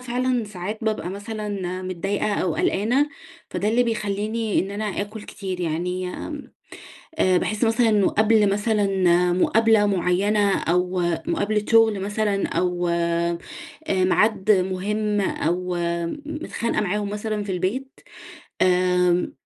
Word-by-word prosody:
فعلًا 250 -1 -1
ساعات 205 +1 -6
بابقى 215 -5 -1
مثلًا 200 -3 -4
متضايقة 195 +3 -2
أو 175 -4 0
قلقانة، 245 +9 +1 0.4
فده 210 - -1
اللي 235 +3 +3
بيخلّيني 215 -1 -1
إن 195 - -4
أنا 210 +2 -4 0.2
آكل 205 +1 -6
كتير 190 -3 -6
يعني، 180 +2 -2
آمم، 290 +10 -7 0.7
آآ 185 -1 +4
باحس 215 +5 -1
مثلًا 230 +1 +3
إنه 210 -3 +3
قبل 215 -1 +3
مثلًا 195 -4 +2
مقابلة 220 +3 +3
مُعيّنة 200 +2 +2
أو 180 +2 0 0.3
مقابلة 210 +1 0
شغل 225 -3 +5
مثلًا 205 0 0
أو 180 -1 -1
آآ 170 0 0 0.5
ميعاد 195 +2 +2
مهم 205 +2 0
أو 180 -1 -1 0.3
م 170 - -4
متخانقة 295 -7 -2
معاهم 205 +1 -1
مثلًا 210 0 -3
في 200 - -4
البيت، 230 - -3 0.6
آآ 180 -1 +3
200 Hz, 125 wpm, -23 LUFS, 180-215 Hz, 0.7 s, شغل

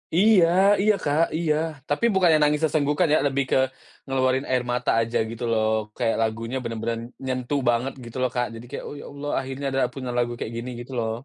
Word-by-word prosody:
Iya 195 -1 +6 0.4
iya, 215 +1 +4
Kak, 145 +3 +2
iya, 160 -2 +1 0.3
tapi 145 +10 +1
bukannya 175 -4 +5
nangis 150 0 +3
sesenggukan 155 +2 +2
ya, - - +6
lebih 140 0 0
ke - - +4 0.5
ngeluarin 130 0 +1
air 125 -1 +2
mata 125 - 0
aja 115 +1 -1
gitu 115 +1 -7
loh, 110 -1 +2 0.3
kayak 115 -3 +1
lagunya 115 +3 -2
bener-bener 115 0 -3 0.3
nyentuh 130 +2 -1
banget 120 +3 0
gitu 115 +1 -8
loh, 130 - +2
Kak, 120 0 +1
jadi 115 +1 -9
kayak, - - -6
"Oh, - - -7
ya - - -9
Allah 145 +1 -6
akhirnya 135 +1 -6
ada 135 0 +1
punya 130 -2 -5
lagu 120 0 +1
kayak 115 - -4
gini." 120 +2 -5
Gitu 120 +2 -9
loh. 110 -1 -1
130 Hz, 205 wpm, -24 LUFS, 120-145 Hz, 0.5 s, Iya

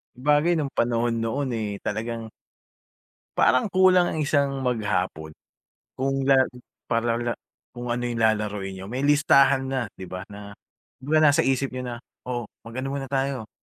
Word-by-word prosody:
Sabagay 150 +6 +3
nung 145 -4 -1
panahon 115 0 0
noon, 130 +4 -1
eh, 110 -3 -2
talagang 115 0 -4 1.1
Parang 130 - +4
kulang 185 -2 +4
ang - - -2
isang 140 -2 +1
maghapon. 95 - -1 0.6
Kung 135 +1 0
la 135 - +7 0.5
para 115 0 0
la 120 0 -1 0.4
kung 120 0 -6
ano 120 +1 -1
yung 120 -1 -2
lalaruin 105 -3 0
niyo, 95 - -8
may 125 +6 -4
listahan 140 -2 +4
na 130 0 -1 0.2
'di 95 - -7
ba, 90 +1 -6
na 100 0 -10 0.5
kumbaga 150 +4 +2
nasa - - +4
isip 135 0 0
niyo 130 - -4
na, 120 - -4 0.3
oh, 120 -2 -2 0.2
mag-ano 130 +4 -5
muna 135 -2 -4
tayo, 135 -4 -2
125 Hz, 155 wpm, -25 LUFS, 115-135 Hz, 1.1 s, la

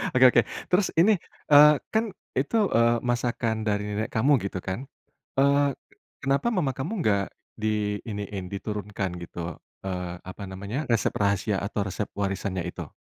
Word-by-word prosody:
Oke 130 - +7
oke. 120 - +5 0.3
Terus 185 +1 +4
ini, 200 +4 +6 0.3
eee, 150 +1 +10 0.2
kan 220 +1 +3 0.3
itu, 145 - +1 0.2
eee, 115 +1 +4
masakan 120 -2 -1
dari 105 0 +1
nenek 105 +2 -2
kamu 130 +7 +3
gitu 95 -1 -3
kan. 95 +10 -4 0.5
Eee, 140 +1 +5 0.6
kenapa 135 - +1
mama 175 - +1
kamu 135 - -4
enggak 100 -2 +3 0.3
di 105 -1 0
iniin, 100 -3 -4
diturunkan 100 -1 -3
gitu, 85 -1 -6 0.3
eee, 90 -2 -3
apa 95 +2 -8
namanya, 100 +10 -4
resep 115 -3 +2
rahasia 100 0 +1
atau 100 +1 -2
resep 100 +2 -3
warisannya 95 -2 -2
itu? - - -8
105 Hz, 145 wpm, -26 LUFS, 100-135 Hz, 0.6 s, eee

